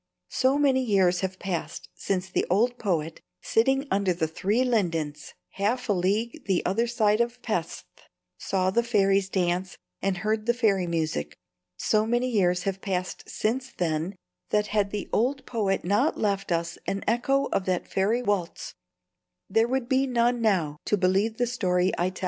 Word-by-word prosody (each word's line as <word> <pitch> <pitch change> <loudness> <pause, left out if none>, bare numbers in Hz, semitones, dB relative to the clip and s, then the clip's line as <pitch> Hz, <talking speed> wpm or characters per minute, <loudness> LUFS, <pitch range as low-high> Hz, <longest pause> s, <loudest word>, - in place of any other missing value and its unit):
So 265 +2 +2
many 270 -3 +3
years 190 -6 +3
have 190 -1 -3
passed 180 -4 -4
since 190 -1 -2
the 185 - -1
old 235 +7 +2
poet, 165 -6 -2 0.2
sitting 270 - +1
under 195 -2 +2
the 165 -2 -1
three 205 +9 0
lindens 165 - -1 0.2
half 230 +6 -1
a - - +4
league 200 +6 -1
the 190 -3 +1
other 225 +6 +1
side 220 -2 +2
of 235 +1 -2
Pesth, 180 -8 -2 0.5
saw 185 -1 0
the 235 - +3
fairies 195 -4 +2
dance 180 0 -1 0.2
and 195 -2 0
heard 215 +3 -1
the 240 - +3
fairy 200 -7 +2
music, 155 - -2 0.4
so 215 0 +1
many 240 +2 +1
years 180 -5 +2
have 195 -1 -3
passed 185 -3 -3
since 250 +4 -2
then, 165 +2 -1 0.3
that 210 0 +2
had 205 -2 +2
the 205 0 -4
old 265 +5 +1
poet 200 -6 -1
not 200 +3 +2
left 200 -3 -1
us 170 0 -1
an 195 - -2
echo 270 +4 +2
of 185 - 0
that 185 -2 -1
fairy 215 +6 +1
waltz 200 -6 -2 0.8
there 225 +3 +3
would 260 -1 -1
be 265 +1 +2
none 240 -1 +1
now 175 -9 +1
to 210 - +2
believe 195 +4 +1
the 245 - +2
story 185 -6 +1
I 175 +1 0
tell. 185 - -11
200 Hz, 170 wpm, -26 LUFS, 180-235 Hz, 0.8 s, a